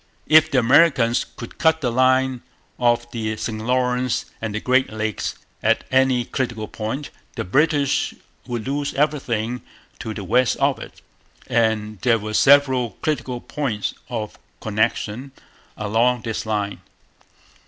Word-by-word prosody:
If 155 Hz, 0 st, +6 dB
the 140 Hz, -, 0 dB
Americans 125 Hz, -1 st, +4 dB
could 120 Hz, -, -10 dB
cut 160 Hz, -1 st, +3 dB
the 125 Hz, -4 st, 0 dB
line 130 Hz, 0 st, +2 dB, 0.4 s
of 120 Hz, -1 st, +2 dB
the 110 Hz, -2 st, -3 dB
St 110 Hz, -1 st, -4 dB
Lawrence 125 Hz, +1 st, 0 dB, 0.2 s
and 110 Hz, -1 st, -3 dB
Great 130 Hz, -1 st, +2 dB
Lakes 110 Hz, -1 st, -3 dB, 0.3 s
at -, -, +2 dB
any 130 Hz, -2 st, +3 dB
critical 120 Hz, -5 st, -3 dB
point, 115 Hz, +7 st, -5 dB, 0.2 s
the -, -, -2 dB
British 145 Hz, -, +1 dB, 0.3 s
would 120 Hz, -1 st, -4 dB
lose 140 Hz, +1 st, -2 dB
everything 125 Hz, -5 st, 0 dB, 0.4 s
to 110 Hz, -, -5 dB
the 100 Hz, -, -5 dB
west 125 Hz, +7 st, +2 dB
of -, -, +1 dB
it; -, -, -11 dB, 0.4 s
and 110 Hz, -3 st, 0 dB
there 115 Hz, -2 st, +3 dB
were 110 Hz, 0 st, -6 dB
several 130 Hz, -2 st, +4 dB
critical 130 Hz, -5 st, -2 dB
points 120 Hz, -9 st, -3 dB, 0.2 s
of 110 Hz, -4 st, -5 dB, 0.2 s
connection 110 Hz, +4 st, -1 dB, 0.4 s
along 115 Hz, +3 st, +1 dB
this 110 Hz, -1 st, -4 dB
line. 105 Hz, -2 st, -2 dB
120 Hz, 130 wpm, -22 LUFS, 110-130 Hz, 0.4 s, If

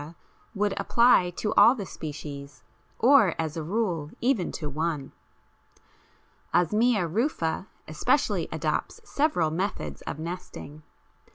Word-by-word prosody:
would 205 Hz, 0 st, +1 dB
apply 235 Hz, -7 st, +4 dB
to 210 Hz, +4 st, -3 dB
all 240 Hz, -, +7 dB
the 205 Hz, -6 st, -5 dB
species, 145 Hz, -3 st, -8 dB, 0.3 s
or, 240 Hz, -, +5 dB
as 160 Hz, -2 st, -2 dB
a 165 Hz, -, -3 dB
rule, 170 Hz, -4 st, -2 dB
even 240 Hz, -7 st, +1 dB
to 155 Hz, -, -5 dB
one. 150 Hz, -1 st, -3 dB, 1.4 s
Osmia 210 Hz, +2 st, +3 dB
rufa 185 Hz, -, -1 dB, 0.2 s
especially -, -, +1 dB
adopts -, -, -2 dB
several 285 Hz, -, +1 dB
methods 160 Hz, -, -3 dB
of -, -, -4 dB
nesting. 160 Hz, -2 st, -7 dB
175 Hz, 110 wpm, -27 LUFS, 155-220 Hz, 1.4 s, all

